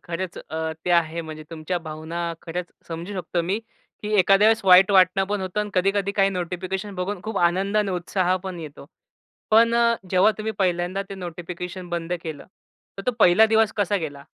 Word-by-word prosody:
खरंच 175 +1 -5
अ, 160 0 -4
ते 180 - -1
आहे. 170 -1 +2
म्हणजे 155 -1 -8
तुमच्या 165 +2 -3
भावना 160 +1 -7 0.2
खरंच 175 +1 -5 0.2
समजू 170 +4 -6
शकतो 175 -2 -2
मी, 190 +5 -1 0.4
की 210 +1 -3
एखाद्या 195 +3 +5
वेळेस 225 0 +3
वाईट 185 +1 +7
वाटणं 190 0 +5
पण 205 +1 -2
होतं 190 +2 -2
आणि 210 - -4
कधी-कधी 195 +2 +1
काही 195 -1 +3
नोटिफिकेशन 185 +2 -4
बघून 180 +1 -3
खूप 220 -2 -3
आनंद 190 +4 +1
आणि 210 -2 +2
उत्साह 180 0 0
पण 185 -2 -5
येतो. 145 -2 -10 0.6
पण 230 +2 +5
अ, 235 0 +4 0.2
जेव्हा 185 +3 +5
तुम्ही 220 +1 -3
पहिल्यांदा 180 +1 0
ते 195 - -6
नोटिफिकेशन 180 0 -7
बंद 170 0 -3
केलं, 155 -3 -7 0.5
तर 195 - -4
तो 250 - +4
पहिला 210 +2 +6
दिवस 220 -1 +3
कसा 205 -1 +1
गेला? 145 -6 -6
185 Hz, 185 wpm, -23 LUFS, 170-200 Hz, 0.6 s, वाईट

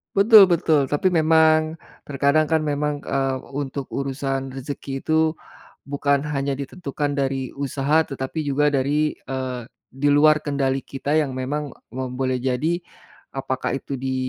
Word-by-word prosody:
Betul 210 +1 +8
betul, 160 -6 +2
tapi 145 +6 +2
memang 160 -1 +3 0.2
terkadang 140 +2 +2
kan 160 +1 +1
memang, 150 -1 -1
eee, 135 -1 -1 0.2
untuk 140 -1 -4
urusan 135 -1 -3
rezeki 135 0 -6
itu 160 +3 +1 0.7
bukan 140 0 +1
hanya 140 -1 -1
ditentukan 145 0 -4
dari 135 -2 -1
usaha 140 +3 +1
tetapi 135 +2 -4
juga 145 +1 +1
dari, 145 +2 +1
eee, 130 -2 -5 0.3
di 140 +2 -1
luar 155 +1 +5
kendali 135 -2 -1
kita 140 +2 -2
yang 150 -4 +1
memang 145 +3 -3 0.3
mem 130 -1 -3
boleh 130 -1 0
jadi 150 +7 0 0.6
apakah 130 -1 -2
itu 140 - -5
di 130 0 -2
140 Hz, 140 wpm, -22 LUFS, 135-155 Hz, 0.7 s, Betul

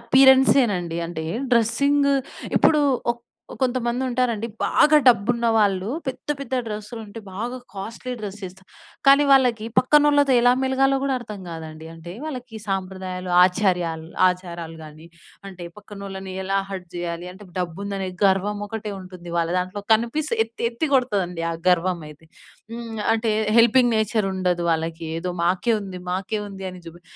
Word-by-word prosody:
అపిరియన్సే 265 +2 +6
నండి. 170 -2 -3
అంటే 160 -2 -5 0.3
డ్రెస్సింగ్ 280 +5 +3 0.5
ఇప్పుడు 300 - +5 0.3
ఒక 240 - -2 0.4
కొంతమంది 245 -1 0
ఉంటారండి. 240 -3 0 0.2
బాగా 305 0 +5
డబ్బున్న 235 0 +4
వాళ్ళు 195 -3 +2 0.2
పెద్ద, 265 - -5
పెద్ద 270 -2 -4
డ్రెస్సులు 215 +1 -6
ఉంటే 215 +2 -9
బాగా 240 +5 -4 0.2
కాస్ట్లీ 230 +6 -6
డ్రెస్ 205 0 -6
వేస్తా. 190 +1 -10 0.4
కానీ 280 +1 +7
వాళ్ళకి 250 -5 +4
పక్కనోళ్ళతో 290 0 +4
ఎలా 245 +1 +5
మెలగాలో 270 +1 +2
కూడా 275 -1 +1
అర్థం 210 -4 -8
కాదండి. 160 -1 -8
అంటే 165 +1 -10
వాళ్ళకి 250 -6 -6
సాంప్రదాయాలు, 185 -1 -4
ఆచార్యాలు 180 -4 0 0.2
ఆచారాలు 170 -3 -5
కానీ 155 +1 -12 0.4
అంటే 185 -2 -10
పక్కనోళ్ళని 195 -2 -8
ఎలా 195 +1 0
హర్ట్ 185 -2 -6
చేయాలి, 175 0 -4
అంటే 200 +1 -13
డబ్బు 175 0 -3
ఉందని 195 -2 -3 0.2
గర్వం 200 +2 +2
ఒకటే 210 0 -5
ఉంటుంది 180 -2 -10
వాళ్ళ 165 -1 +1
దాంట్లో 185 +3 -4
కనిపిస్తే 235 +3 -1
ఎత్తి 230 +1 -4
ఎత్తి 245 +7 -2
కొడతదండి 190 -9 0
ఆ - - -4
గర్వం 180 0 +2
అయితే. 150 +2 -16 0.5
హ్మ్. 230 -2 -6
అంటే 225 0 0 0.3
హెల్పింగ్ 240 +1 +5
నేచర్ 220 -1 +1
ఉండదు 180 -2 0
వాళ్ళకి. 165 0 -2
ఏదో 180 0 -3
మాకే 180 +6 +2
ఉంది, 190 -2 -7
మాకే 200 +4 -2
ఉంది 195 -1 -7
అని 180 - -11
జుబి 175 +1 -11
205 Hz, 145 wpm, -23 LUFS, 180-240 Hz, 0.5 s, కానీ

